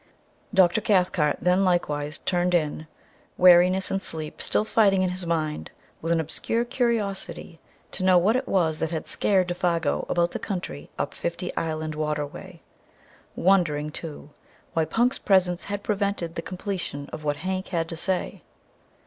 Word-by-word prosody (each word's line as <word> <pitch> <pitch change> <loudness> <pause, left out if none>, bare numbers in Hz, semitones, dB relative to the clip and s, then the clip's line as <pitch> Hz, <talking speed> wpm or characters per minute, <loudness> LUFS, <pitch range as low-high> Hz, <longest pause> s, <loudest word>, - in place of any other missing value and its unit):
Dr. 190 0 +4
Cathcart 180 -8 +2
then 180 +2 +3
likewise 150 -5 0
turned 180 0 0
in, 155 -1 -1 0.5
weariness 180 +1 +6
and 195 - 0
sleep 155 -4 -3
still 210 - +1
fighting 200 -4 +3
in 185 - 0
his 180 -1 -4
mind 155 -2 -2 0.3
with 165 - -2
an 170 - +3
obscure 225 +9 -1
curiosity 215 -9 -2 0.3
to - - -4
know 185 -1 +6
what 200 +7 +3
it 255 - -1
was 160 -5 +1
that 160 - -1
had 160 -1 -4
scared 190 -3 +2
Défago 175 -3 -1
about 175 0 +1
the - - -4
country 125 - -5
up - - -2
Fifty 170 +1 -4
Island 155 -1 -2
Water 150 -1 -1
way, 145 - -11 0.7
wondering, 160 -6 +2
too, 150 -2 -8 0.4
why 160 -1 +1
Punk's 240 +9 +1
presence 185 -3 +2
had 205 0 -4
prevented 200 -5 -1
the 165 - -4
completion 175 -4 -5
of 155 - -6
what 145 -1 0
Hank 185 0 -2
had 165 -3 -1
to 165 - -5
say. 185 +2 -2
175 Hz, 155 wpm, -25 LUFS, 160-190 Hz, 0.7 s, weariness